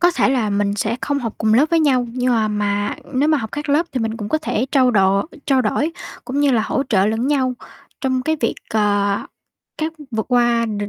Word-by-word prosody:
có 350 0 +5
thể 335 - +1
là 245 -6 +1
mình 200 0 0
sẽ 220 +3 -1
không 285 -1 -1
học 230 -5 -4
cùng 220 0 +2
lớp 275 +7 +5
với 335 - +3
nhau, 260 -5 +2
nhưng 250 0 0
mà 220 -2 +2
mà 205 -1 -1 0.2
nếu 285 +4 +2
mà 305 -2 +3
học 220 -3 -5
các 295 +1 -5
lớp 300 +4 +2
thì 255 - -1
mình 225 0 -2
cũng 210 -2 -5
có 310 - +1
thể 260 -5 -1
trao 260 -3 +4
đổ 195 -2 +3 0.2
trao 265 -2 +3
đổi 290 +9 0 0.3
cũng 275 +2 -2
như 290 -1 +3
là 225 - +2
hỗ 270 +5 -1
trợ 195 -4 +3
lẫn 225 +3 0
nhau 260 -3 +1 0.5
trong 260 -2 0
cái 315 +3 0
việc, 230 - 0 0.2
ờ, 205 -2 +2 0.6
các 315 +1 -2 0.2
vượt 220 -2 -2
qua 240 -2 +2
được 205 -1 -3
240 Hz, 235 wpm, -20 LUFS, 215-275 Hz, 0.6 s, có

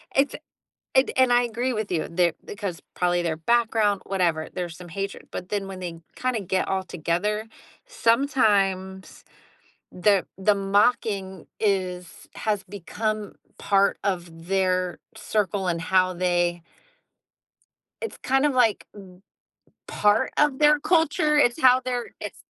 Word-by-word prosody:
it's 275 +1 +2 0.6
and 265 0 +4
and 260 -1 +4
I 245 0 +5
agree 240 +2 -2
with 215 -3 -3
you, 165 -3 0
they're 170 -1 +2 0.2
'cause 185 -5 -4
probably 175 -1 +1
their 165 -2 -1
background, 220 +1 +2
whatever, 170 -5 0
there's 175 -3 -4
some 180 -1 -11
hatred, 195 +3 -5
but 180 - -6
then 205 -2 -2
when 190 -1 -8
they 170 -2 -6 0.2
kinda 255 -3 -1
get 185 0 -1
all 190 0 0
together, 185 +6 -2 0.4
sometimes 205 - +1 0.7
the 190 -1 +2
the 195 +2 +3
mocking 195 -2 0
is 185 -4 -2
has 210 -3 -1
become 205 +3 -4 0.2
part 200 0 +2
of 170 -4 -3
their 185 -2 0 0.2
circle 205 -3 -1
and 170 -1 -1
how 185 +2 +2
they 175 -1 0 1.4
it's 460 - -5
kind 270 +2 +2
of 290 - +1
like, 245 -5 +2
m 200 -2 -11 0.8
part 210 +5 +2
of 295 -3 +3
their 300 0 +5
culture, 305 -1 +2
it's 245 -1 +3
how 255 -1 +6
they're 245 -1 -2
it's - - -7
195 Hz, 135 wpm, -24 LUFS, 180-235 Hz, 1.4 s, how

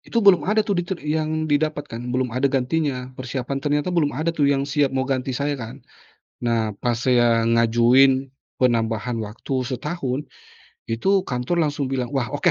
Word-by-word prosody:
Itu 230 -3 -1
belum 180 -4 +5
ada 215 +1 +3
tuh 200 -4 0
ditut 175 +1 -4
yang 155 +1 -1
didapatkan, 145 -5 -1
belum 125 -1 -1
ada 130 +3 +1
gantinya, 130 -1 -1
persiapan 130 +1 -4
ternyata 145 +2 0
belum 160 -5 +2
ada 160 +3 0
tuh 145 -4 +2
yang 140 -1 +1
siap 145 0 +1
mau 130 - +1
ganti 130 -1 -2
saya 145 +1 -1
kan. 115 -1 -9 0.6
Nah 110 -3 0
pas 120 +2 -1
saya 120 -2 +3
ngajuin 120 +4 +4 0.3
penambahan 115 -1 +1
waktu 110 +6 -6
setahun, 135 +1 -3 0.6
itu 190 +12 +2
kantor 135 +4 -1
langsung 145 -2 -1
bilang, 130 -2 -2
"Wah 135 -4 -1
oke, - - +2
135 Hz, 165 wpm, -22 LUFS, 125-150 Hz, 0.6 s, belum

